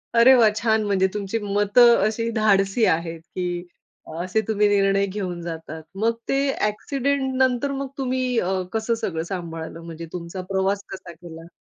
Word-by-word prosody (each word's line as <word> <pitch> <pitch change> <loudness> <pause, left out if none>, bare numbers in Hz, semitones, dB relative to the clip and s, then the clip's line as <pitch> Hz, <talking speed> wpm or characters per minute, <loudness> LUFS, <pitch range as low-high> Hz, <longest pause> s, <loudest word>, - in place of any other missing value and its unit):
अरे 235 +3 +8
वाह! 225 -3 +6
छान 220 -1 +2
म्हणजे 190 -2 +2
तुमची 210 +1 -2
मतं 205 +4 +4
अशी 230 +1 -2
धाडसी 210 0 +2
आहेत, 165 0 0
की 175 +1 -4 0.6
असे 185 +5 0
तुम्ही 210 -1 +2
निर्णय 195 -1 +3
घेऊन 185 -3 -4
जातात. 160 -1 -7
मग 225 +4 +1 0.2
ते 270 - +2 0.2
ॲक्सिडेंट 265 +5 -1
नंतर 260 +2 +2
मग 275 0 -3
तुम्ही 255 -2 0
अ, 185 -1 0
कसं 225 +1 0
सगळं 165 -7 -2
सांभाळलं? 165 -2 -6
म्हणजे 165 0 -7
तुमचा 180 +1 -6
प्रवास 195 +1 0
कसा 185 -2 -8
केला? 165 -1 -12
200 Hz, 155 wpm, -23 LUFS, 175-230 Hz, 0.6 s, अरे